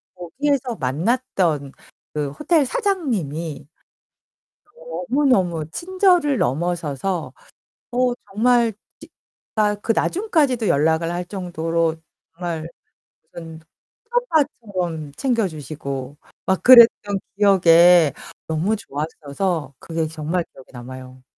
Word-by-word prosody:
거기에서 255 - -2
만났던 160 - -1 0.4
그 150 -2 -2
호텔 300 - +1
사장님이 175 - -2 1.1
너무너무 260 - 0
친절을 355 - +2
넘어서서 165 +4 -2 0.6
어 250 0 +1 0.2
정말 235 +1 +3 0.3
진짜 210 -1 -4
그 225 - 0
나중까지도 300 - +1
연락을 160 +2 +2
할 175 0 -3
정도로 165 -3 -2 0.4
정말 165 -2 -4 0.7
무슨 165 -1 -9 0.5
친오빠처럼 225 - -1
챙겨 235 -6 +1
주시고 140 -3 -7 0.3
막 190 0 0
그랬던 230 -5 +7 0.2
기억에 175 -5 +6 0.3
너무 165 +7 0
좋았어서 155 -1 -4
그게 165 -1 -3
정말 160 +3 -2
기억에 135 - -15
남아요. 130 +1 -10
175 Hz, 225 characters per minute, -21 LUFS, 155-245 Hz, 1.1 s, 그랬던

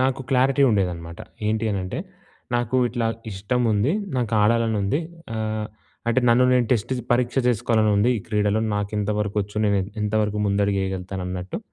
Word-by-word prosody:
నాకు 130 +1 +1
క్లారిటీ 135 +2 +3
ఉండేదనమాట. 85 -5 -2 0.3
ఏంటి 110 +1 0
అని 100 - -1
అంటే 105 - -4 0.6
నాకు 120 +1 0
ఇట్లా 120 -1 -1 0.2
ఇష్టం 105 +6 -2
ఉంది. 105 - +2 0.2
నాకు 120 -4 -1
ఆడాలని 115 0 +2
ఉంది. 100 +10 0 0.3
ఆహ్, 110 -1 -2 0.4
అంటే 120 +2 +3
నన్ను 120 +2 +5
నేను 125 -2 +3
టెస్ట్ 115 +2 0 0.2
పరీక్ష 120 +1 +1
చేసుకోవాలని 110 -2 +2
ఉంది 110 +5 +3
ఈ - - -6
క్రీడలో 105 0 +1
నాకు 105 0 -2
ఎంతవరకు 105 0 -1
వచ్చు, 105 +1 -12
నేను 100 -1 +3 0.2
ఎంతవరకు 105 0 0
ముందడుగు 100 0 +1
వేయగలుగుతాను 95 0 -4
అన్నట్టు 90 0 -4
105 Hz, 160 wpm, -23 LUFS, 100-120 Hz, 0.6 s, నన్ను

